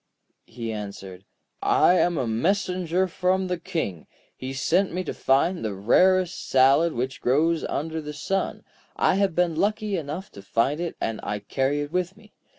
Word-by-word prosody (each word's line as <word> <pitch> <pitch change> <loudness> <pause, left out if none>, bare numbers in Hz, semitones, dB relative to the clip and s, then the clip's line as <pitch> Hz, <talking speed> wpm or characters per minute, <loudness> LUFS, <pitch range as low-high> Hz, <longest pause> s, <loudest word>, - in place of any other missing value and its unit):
He 115 -2 -5
answered: 100 -3 -7 0.4
'I - - +4
am 175 -2 +2
a 130 - 0
messenger 180 - 0
from 185 +1 0
the 180 -1 -2
King. 160 - -4 0.3
He 130 +1 -6
sent 175 +8 +1
me 180 +2 -2
to - - -4
find 165 +6 +1
the 105 -3 -2
rarest 185 - +2
salad 135 +5 +4
which 130 +3 -3
grows 160 +6 +2
under 160 +2 -3
the 150 0 -6
sun. 190 +6 -2 0.3
I - - +3
have 195 -4 +1
been 175 -1 +2
lucky 210 +2 0
enough 160 +4 -5
to 100 - -11
find 115 +9 0
it, 175 -1 -3
and 115 -1 -2
I 105 +1 -3
carry 135 +7 -1
it 145 0 -5
with 180 +2 -2
me. 215 -1 -19
160 Hz, 170 wpm, -25 LUFS, 130-185 Hz, 0.4 s, I